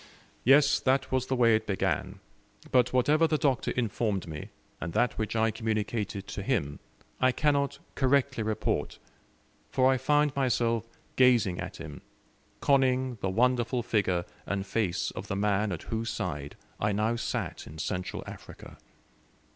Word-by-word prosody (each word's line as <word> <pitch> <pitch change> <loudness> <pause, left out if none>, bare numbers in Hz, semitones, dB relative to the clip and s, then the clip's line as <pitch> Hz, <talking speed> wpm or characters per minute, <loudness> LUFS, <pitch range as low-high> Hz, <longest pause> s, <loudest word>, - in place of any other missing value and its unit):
Yes, 140 +3 +5
that 135 +1 +1
was 130 -1 0
the 130 - 0
way 115 -3 +5
it 110 - -2
began: 100 -2 -1 0.5
but 125 -1 +4
whatever 150 +6 +3
the 155 - +1
Doctor 140 -4 +1
informed 110 -5 -1
me, 75 -2 -7 0.3
and 85 - -5
that 125 - +2
which 110 0 -2
I 110 0 +2
communicated 110 -2 -2
to - - -5
him, 95 - -1 0.4
I 130 - +4
cannot 140 0 +1 0.2
correctly 135 -2 +2
report, 110 0 -1 0.7
for 130 0 +3
I 130 - +2
found 145 +2 +2
myself 115 -4 +1 0.3
gazing 120 -8 +4
at - - -6
him, 75 -3 -9 0.6
conning 130 -3 +2
the 95 - 0
wonderful 120 +3 +1
figure 95 -6 0 0.2
and 100 -1 -2
face 100 -4 -1
of - - -7
the 95 - -2
man 100 +1 +1
at 90 - -5
whose 115 0 -3
side 75 -9 -4 0.2
I 105 0 +1
now 110 +3 +1
sat 120 - -4
in 75 - -10
Central 90 +3 -3
Africa. - - -11
115 Hz, 150 wpm, -29 LUFS, 100-130 Hz, 0.7 s, Yes